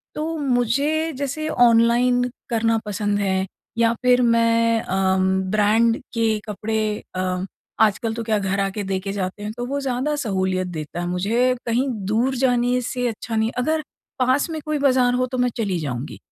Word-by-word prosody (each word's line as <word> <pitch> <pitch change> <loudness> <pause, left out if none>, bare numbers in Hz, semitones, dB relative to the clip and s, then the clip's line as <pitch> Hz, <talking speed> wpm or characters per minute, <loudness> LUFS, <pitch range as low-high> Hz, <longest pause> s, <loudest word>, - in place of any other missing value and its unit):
तो 320 +1 -3
मुझे 280 +4 +1
जैसे 285 +3 -3
ऑनलाइन 240 +1 +4 0.3
करना 225 -1 +2
पसंद 205 0 -1
है 190 -1 0 0.3
या 230 0 +3
फिर 250 0 +4
मैं 230 -1 +3
अ, 190 0 +1
उम, 190 0 +2
ब्रांड 220 +2 +3 0.2
के 225 -2 +1
कपड़े 215 +1 -2 0.3
अ, 185 0 -1 0.3
आजकल 220 +1 +2
तो 230 +1 -4
क्या 220 -1 +1
घर 195 0 -1
आके 195 +1 -1
देके 195 0 -3
जाते 200 +1 -4
हैं 210 - -3
तो 245 - -3
वो 280 +2 -2
ज़्यादा 270 +3 -1
सहूलियत 190 -6 -1
देता 155 -1 -6
है 175 - -3
मुझे 225 +8 +1
कहीं 240 +4 +1 0.2
दूर 245 +5 +1
जाने 245 -1 +2
से 250 +1 -2
अच्छा 225 0 -4
नहीं 220 0 +2
अगर 310 +5 +1 0.4
पास 260 +5 +2
में 320 -1 -4
कोई 305 0 -1
बाज़ार 255 -2 +4
हो 250 +1 +1
तो 255 - -2
मैं 250 0 +2
चली 200 -6 -1
जाऊँगी, 135 -2 -5
230 Hz, 175 wpm, -22 LUFS, 200-250 Hz, 0.4 s, ऑनलाइन